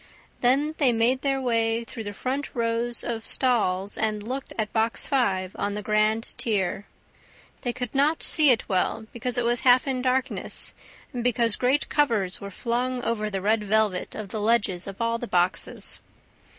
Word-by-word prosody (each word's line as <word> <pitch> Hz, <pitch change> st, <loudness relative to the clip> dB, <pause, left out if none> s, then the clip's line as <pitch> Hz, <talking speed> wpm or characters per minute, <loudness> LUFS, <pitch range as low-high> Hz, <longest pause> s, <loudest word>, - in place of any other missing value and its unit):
Then 275 Hz, +5 st, +2 dB
they 270 Hz, -5 st, +5 dB
made 240 Hz, +3 st, +2 dB
their 275 Hz, -1 st, 0 dB
way 230 Hz, -2 st, +1 dB
through 225 Hz, -1 st, -8 dB
the 205 Hz, -, -4 dB
front 265 Hz, +6 st, -4 dB
rows 235 Hz, 0 st, 0 dB
of 225 Hz, -1 st, -4 dB
stalls 205 Hz, -7 st, +1 dB
and 215 Hz, -1 st, -1 dB
looked 260 Hz, +5 st, -5 dB
at 215 Hz, -2 st, -2 dB
Box 225 Hz, 0 st, +1 dB
Five 190 Hz, -9 st, 0 dB
on 200 Hz, 0 st, -1 dB
the 210 Hz, -, -4 dB
grand 215 Hz, +1 st, +1 dB
tier, 205 Hz, -3 st, -1 dB, 0.7 s
They 245 Hz, -, -1 dB
could 245 Hz, -1 st, -5 dB
not 290 Hz, +4 st, +2 dB
see 305 Hz, -3 st, +4 dB
it 240 Hz, -3 st, +3 dB
well, 200 Hz, +3 st, 0 dB
because 245 Hz, +1 st, -3 dB
it 245 Hz, -, +1 dB
was 240 Hz, 0 st, +2 dB
half 250 Hz, 0 st, +5 dB
in 260 Hz, -2 st, -1 dB
darkness 255 Hz, 0 st, 0 dB, 0.4 s
and 245 Hz, -2 st, -3 dB
because 235 Hz, -2 st, +3 dB
great 260 Hz, +3 st, +1 dB
covers 225 Hz, -11 st, +1 dB
were 200 Hz, -, -6 dB
flung 245 Hz, +4 st, -2 dB
over 215 Hz, -2 st, -1 dB
the 195 Hz, -2 st, -3 dB
red 215 Hz, +2 st, +1 dB
velvet 210 Hz, -2 st, +1 dB
of 210 Hz, -2 st, -6 dB
the 215 Hz, -, -4 dB
ledges 205 Hz, -5 st, +1 dB
of 195 Hz, -1 st, -8 dB
all 230 Hz, 0 st, 0 dB
the 240 Hz, -, -5 dB
boxes. 180 Hz, -1 st, 0 dB
230 Hz, 175 wpm, -25 LUFS, 210-250 Hz, 0.7 s, they